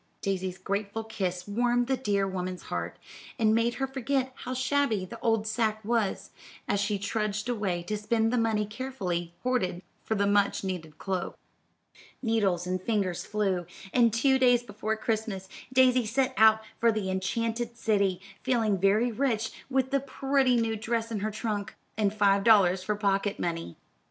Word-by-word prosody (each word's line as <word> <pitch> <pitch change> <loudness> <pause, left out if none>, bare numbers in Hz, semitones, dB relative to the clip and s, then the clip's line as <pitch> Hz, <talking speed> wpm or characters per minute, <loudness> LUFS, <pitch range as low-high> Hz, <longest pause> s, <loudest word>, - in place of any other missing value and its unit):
Daisy's 190 -2 -2
grateful 200 +3 -3
kiss 185 -5 -3
warmed 240 +3 +1
the 265 +2 +1
dear 205 -6 0
woman's 185 -1 -4
heart, - - -4 0.4
and 220 -3 +3
made 230 +1 +2
her 270 - -1
forget 265 0 -1
how 255 0 -6
shabby 260 -6 +1
the - - -9
old 225 -2 +1
sack 220 -1 0
was, 225 -3 0 0.4
as 205 - +1
she 205 0 0
trudged 210 +1 -2
away 200 -8 -1
to 210 +5 -3
spend 225 +2 +1
the - - +2
money 220 -2 +1
carefully 195 -8 -4
hoarded 185 -8 0 0.2
for 220 - -1
the 200 -1 +2
much 200 0 +2
needed 170 -5 -5
cloak. 190 -1 -3 0.8
Needles 205 -7 +1
and 185 0 -2
fingers 195 -4 -1
flew, 195 -5 0 0.3
and 235 -2 +5
two 265 +4 +3
days 245 -2 +4
before 215 0 -3
Christmas, 215 -4 -2 0.2
Daisy 255 -2 +4
set 260 +3 +1
out 220 -1 +6 0.2
for 230 0 +4
the 210 -3 -2
enchanted 230 +5 -2
city, 200 -5 +1 0.2
feeling 225 -6 +1
very 210 +6 +3
rich 225 -2 0 0.2
with 265 0 +1
the 275 - +3
pretty 270 -1 +1
new 225 -1 +1
dress 230 +1 -2
in 215 - -1
her 215 +2 -1
trunk, 215 -1 -3 0.2
and 210 -2 +1
five 200 -1 +3
dollars 190 -5 +5
for 210 +3 -1
pocket 200 0 0
money. 165 - -3
215 Hz, 165 wpm, -28 LUFS, 195-235 Hz, 0.8 s, out